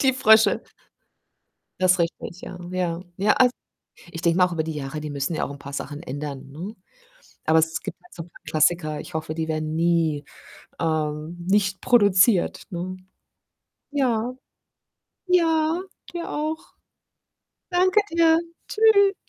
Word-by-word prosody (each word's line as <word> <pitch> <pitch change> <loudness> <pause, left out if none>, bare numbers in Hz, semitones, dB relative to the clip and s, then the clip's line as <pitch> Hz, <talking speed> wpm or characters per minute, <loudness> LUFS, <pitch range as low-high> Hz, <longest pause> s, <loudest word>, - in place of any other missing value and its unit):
die 265 -1 +4
Frösche. 220 -4 +5 1.2
Das 185 0 +4
richtig, 170 +1 -3
ja, 180 - -8
ja. 180 -1 -2
Ja, 205 +2 +3
als 250 -1 +4 0.6
ich 165 0 -6
denke 170 +1 +2
mal 180 - +7
auch 180 - -6
über 160 -2 0
die 160 0 -4
Jahre, 145 0 -5
die 150 -1 -5
müssen 140 +3 -2
ja - - -1
auch - - -6
'n 140 - -8
paar 140 0 -9
Sachen 145 +2 -5
ändern, 140 -2 -6
ne? 180 +10 -7 0.7
Aber 160 +1 +5
es 160 0 0
gibt - - -6
halt 360 - -19
so 165 - -7
paar 170 - -18
Klassiker, 155 -1 +2
ich - - -9
hoffe, 155 0 -3
die 160 -1 -2
werden 155 0 -2
nie, 165 -3 +1 0.6
ähm, 155 0 -1
nicht 195 -1 +2
produziert, 205 -4 +4
ne? 185 +1 -4 0.9
Ja. 250 -4 0 1.0
Ja, 325 -1 +3 0.3
dir 340 -1 -4
auch. 310 +2 -4 1.0
Danke 370 +4 +4
dir. 330 -1 +5 0.3
Tschü 405 -3 +3
175 Hz, 145 wpm, -24 LUFS, 155-250 Hz, 1.2 s, mal